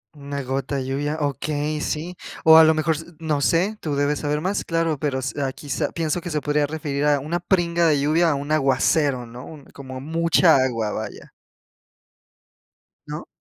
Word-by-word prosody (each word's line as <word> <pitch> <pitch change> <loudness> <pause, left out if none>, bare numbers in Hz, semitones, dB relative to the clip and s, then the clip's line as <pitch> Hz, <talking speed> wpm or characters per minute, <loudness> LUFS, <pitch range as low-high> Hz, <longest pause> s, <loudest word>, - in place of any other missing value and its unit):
Una 140 -1 -5
gota 135 +2 -3
de 130 -2 -2
lluvia, 145 +3 -2
okey, 150 +1 -2
sí. 170 +4 -3 0.3
O 160 0 +9
a 160 - +9
lo 160 0 +5
mejor 160 +1 +1
s 165 - -7
no 155 -3 -1
sé, 180 +10 +1
tú 150 -3 -2
debes 145 +1 0
saber 150 0 -1
más. 190 +4 -1
Claro, 165 -3 -1
pero 140 -2 -1
s 130 +1 -3
ah, 135 -1 0
quizá, 145 +1 -3
pienso 165 +1 -2
que 175 - -6
se 150 - -1
podría 145 0 0
referir 145 -2 -3
a 145 -1 +3
una 155 +5 -2
pringa 170 -2 +1
de 150 -2 +3
lluvia, 160 +4 +3
a 145 - +1
un 145 +2 -5
aguacero, 135 -2 +2
¿no? 120 +2 -10
Un 150 -4 -12
como 130 -2 -9
mucha 165 +2 +3
agua, 115 -5 0
vaya. 110 0 -7 1.8
¿No? - - -6
150 Hz, 190 wpm, -23 LUFS, 140-160 Hz, 1.8 s, O